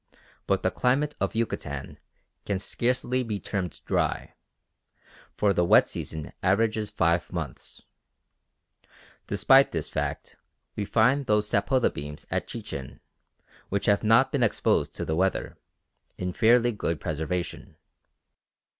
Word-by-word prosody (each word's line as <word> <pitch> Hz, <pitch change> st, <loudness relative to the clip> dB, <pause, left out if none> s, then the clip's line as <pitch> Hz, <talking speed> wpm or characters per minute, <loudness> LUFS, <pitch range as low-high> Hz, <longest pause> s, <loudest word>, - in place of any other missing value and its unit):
But -, -, +1 dB
the -, -, +2 dB
climate 140 Hz, +4 st, +1 dB
of 100 Hz, +2 st, -1 dB
Yucatan 75 Hz, -, -3 dB, 0.4 s
can 100 Hz, -, -1 dB
scarcely 125 Hz, +5 st, -1 dB
be 110 Hz, -4 st, -3 dB
termed 90 Hz, -8 st, -4 dB
dry; -, -, -1 dB, 1.0 s
for 100 Hz, -1 st, +3 dB
the 90 Hz, -, +2 dB
wet 85 Hz, -, +6 dB
season 80 Hz, -2 st, -6 dB
averages 105 Hz, +2 st, +1 dB
five 85 Hz, 0 st, +1 dB
months. 80 Hz, -8 st, -6 dB, 1.4 s
Despite 135 Hz, +7 st, +5 dB
this 80 Hz, -3 st, -3 dB
fact -, -, -4 dB, 0.4 s
we 105 Hz, -, -2 dB
find 125 Hz, +7 st, +2 dB
those 105 Hz, 0 st, +2 dB
sapota 130 Hz, +3 st, +2 dB
beams 75 Hz, +1 st, -7 dB
at -, -, -1 dB
Chichen, 65 Hz, -2 st, -7 dB, 0.7 s
which 100 Hz, 0 st, -1 dB
have 100 Hz, +1 st, +3 dB
not 115 Hz, +5 st, +5 dB
been 140 Hz, -, 0 dB
exposed 115 Hz, -, +1 dB
to -, -, -4 dB
the 80 Hz, -, -1 dB
weather, 95 Hz, +3 st, 0 dB, 0.6 s
in 90 Hz, 0 st, -3 dB
fairly 120 Hz, +3 st, +4 dB
good 85 Hz, -7 st, -2 dB
preservation. 80 Hz, +3 st, -4 dB
100 Hz, 125 wpm, -27 LUFS, 85-120 Hz, 1.4 s, wet